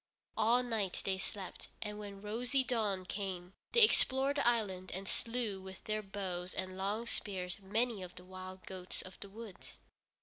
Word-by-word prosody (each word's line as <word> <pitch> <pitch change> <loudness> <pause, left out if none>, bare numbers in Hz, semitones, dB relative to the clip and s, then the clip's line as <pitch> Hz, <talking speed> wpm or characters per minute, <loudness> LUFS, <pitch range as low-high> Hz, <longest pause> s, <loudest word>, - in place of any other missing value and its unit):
All 235 +3 +5
night 220 -6 0
they 190 -1 +2
slept, 190 0 -4
and 210 0 -3
when 200 -1 -7
rosy 245 +5 +2
dawn 215 -7 +1
came 185 -2 -3 0.2
they 475 - +6
explored 275 -8 +5
the - - +4
island 200 -6 +2
and 195 +1 -3
slew 230 -5 0
with 190 0 -9
their 215 0 0
bows 190 -3 -3
and 185 0 -2
long 200 +4 0
spears 185 -6 -1
many 220 +2 +1
of 180 -1 -7
the 180 - -9
wild 185 0 -7
goats 185 -1 -5
of 185 - -10
the 200 - -5
woods. 215 -1 -9
200 Hz, 170 wpm, -36 LUFS, 185-230 Hz, 0.2 s, they